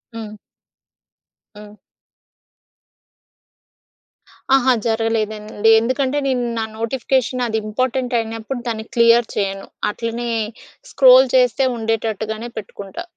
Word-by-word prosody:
హ్మ్. 220 -2 -7 1.2
హ్మ్. 210 0 -12 2.8
అహా! 265 -1 +4
జరగలేదండి. 220 -1 0
ఎందుకంటే 260 +3 -1
నేను 260 -2 0 0.2
నా 225 - 0 0.2
నోటిఫికేషన్ 255 +1 -1
అది 220 -1 -1
ఇంపార్టెంట్ 255 +3 -2
అయినప్పుడు 225 +3 -5
దాన్ని 220 -1 -3
క్లియర్ 235 0 +5
చేయను. 195 -1 -2 0.2
అట్లనే 230 +2 -4 0.6
స్క్రోల్ 260 0 +7
చేస్తే 255 +1 +3
ఉండేటట్టుగానే 220 0 -3
పెట్టుకుంటా. 200 - -7
230 Hz, 85 wpm, -19 LUFS, 220-255 Hz, 2.8 s, స్క్రోల్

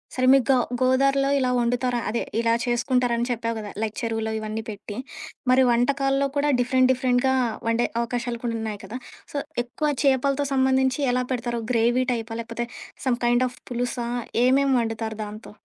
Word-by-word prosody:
సరే 255 - +1
మీకు 270 -3 +5
గ - - +6 0.3
గోదారిలో 275 +2 +3
ఇలా 255 -2 +1
వండుతార 245 +1 0
అదే 230 +2 -1 0.2
ఇలా 230 0 +2
చేసుకుంటారని 240 0 +1
చెప్పావు 230 -1 -2
కదా 210 -1 -6
లైక్ 220 -1 -2
చెరువులో 225 -1 -2
ఇవన్నీ 215 +1 -4
పెట్టి. 205 0 -7 0.5
మరి 260 +1 +6
వంటకాల్లో 275 +3 +2
కూడా 290 +1 +2
డిఫరెంట్ 255 +1 +3
డిఫరెంట్‌గా 260 0 +2 0.3
వండే 230 +1 +2
అవకాశాలు 235 0 -2
కూడా 230 -1 -1
ఉన్నాయి 215 -2 -4
కదా! 245 - -6 0.4
సో, 290 - -2 0.3
ఎక్కువ 280 +5 -3 0.2
చేపలతో 275 +1 +2
సంబంధించి 265 0 +2
ఎలా 250 0 +1
పెడతారు? 240 -1 -2
గ్రేవీ 240 +2 +2
టైపా? 225 -1 -4
లేకపోతే 230 +1 -4 0.4
సమ్ 245 -2 +1
కైండ్ 240 +1 +3
ఆఫ్ 250 - -10
పులుసా? 245 0 -2 0.4
ఏమేం 270 +2 +3
వండుతారు 225 -1 -3
దాంతో? 210 +2 -9
245 Hz, 155 wpm, -24 LUFS, 230-260 Hz, 0.5 s, గ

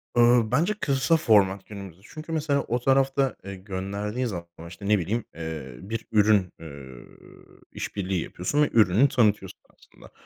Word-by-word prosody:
Iıı, 120 -2 +4
bence, 175 +7 +2
kısa 135 +3 +2
format 100 -8 +3
günümüzde. 100 -4 -10
Çünkü, 155 +1 -9
mesela, 145 -3 0
o 120 +2 0
tarafta, 135 +1 +2
eee, 100 0 -6
gönderdiğin 100 +5 -4
zaman, 90 -7 -5 0.2
işte, 90 +4 -9
ne 105 -2 +3
bileyim, 105 +7 -2
eee, 80 -6 -6
bir 110 +3 -5
ürün, 105 -3 +3
eee, 80 - -11
ööö, 65 -5 -11 0.7
iş - - -6
birliği 95 -3 -1
yapıyorsun 145 +12 -2
ve - - +1
ürünü 110 +4 +4
tanıtıyorsun 105 -7 +1
aslında. - - -19
105 Hz, 160 wpm, -25 LUFS, 95-130 Hz, 0.7 s, Iıı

